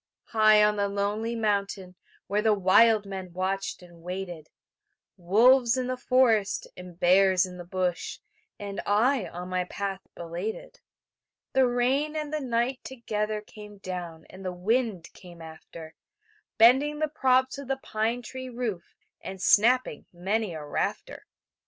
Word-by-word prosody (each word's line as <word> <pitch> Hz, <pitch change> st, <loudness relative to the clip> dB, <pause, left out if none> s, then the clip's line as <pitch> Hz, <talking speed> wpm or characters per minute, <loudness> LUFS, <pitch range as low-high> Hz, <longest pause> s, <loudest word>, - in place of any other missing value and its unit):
High 215 Hz, -1 st, +5 dB
on 210 Hz, 0 st, +2 dB
the 200 Hz, 0 st, +1 dB
lonely 205 Hz, +3 st, -2 dB
mountain 200 Hz, -4 st, -2 dB, 0.3 s
Where 205 Hz, +1 st, 0 dB
the 215 Hz, -1 st, +3 dB
wild 205 Hz, +3 st, +4 dB
men 190 Hz, -2 st, -7 dB
watched 190 Hz, +1 st, -3 dB
and 170 Hz, -1 st, -16 dB
waited; 175 Hz, -3 st, -6 dB, 0.7 s
Wolves 235 Hz, +7 st, +4 dB
in 255 Hz, -, -1 dB
the 255 Hz, +1 st, -2 dB
forest, 250 Hz, -5 st, +2 dB
and 180 Hz, -1 st, -12 dB
bears 185 Hz, +1 st, +4 dB
in 180 Hz, -1 st, -10 dB
the -, -, -6 dB
bush, 180 Hz, -1 st, -2 dB, 0.4 s
And 200 Hz, -1 st, -5 dB
I 225 Hz, +3 st, +2 dB
on 180 Hz, +1 st, -8 dB
my 185 Hz, 0 st, -1 dB
path 195 Hz, +1 st, -4 dB
belated. 175 Hz, -, -6 dB, 0.7 s
The 265 Hz, -1 st, +4 dB
rain 260 Hz, +5 st, 0 dB
and 305 Hz, -1 st, -4 dB
the 305 Hz, -, 0 dB
night 250 Hz, +1 st, -1 dB
together 215 Hz, -4 st, -3 dB
Came 210 Hz, -1 st, -13 dB
down, 175 Hz, -4 st, -7 dB
and 190 Hz, +1 st, -12 dB
the 185 Hz, -, -3 dB
wind 200 Hz, 0 st, -1 dB
came 175 Hz, -2 st, -14 dB
after, 160 Hz, 0 st, -11 dB, 0.6 s
Bending 265 Hz, +7 st, +5 dB
the 310 Hz, +1 st, 0 dB
props 260 Hz, -2 st, +1 dB
of 280 Hz, -, -8 dB
the 270 Hz, 0 st, -1 dB
pine 230 Hz, 0 st, -2 dB
tree 260 Hz, +1 st, -7 dB
roof 235 Hz, -8 st, -5 dB, 0.3 s
And 190 Hz, 0 st, -7 dB
snapping 230 Hz, -, +3 dB
many 190 Hz, +1 st, -2 dB
a 150 Hz, -1 st, -7 dB
rafter. 145 Hz, -, -4 dB
205 Hz, 145 wpm, -27 LUFS, 185-245 Hz, 0.7 s, High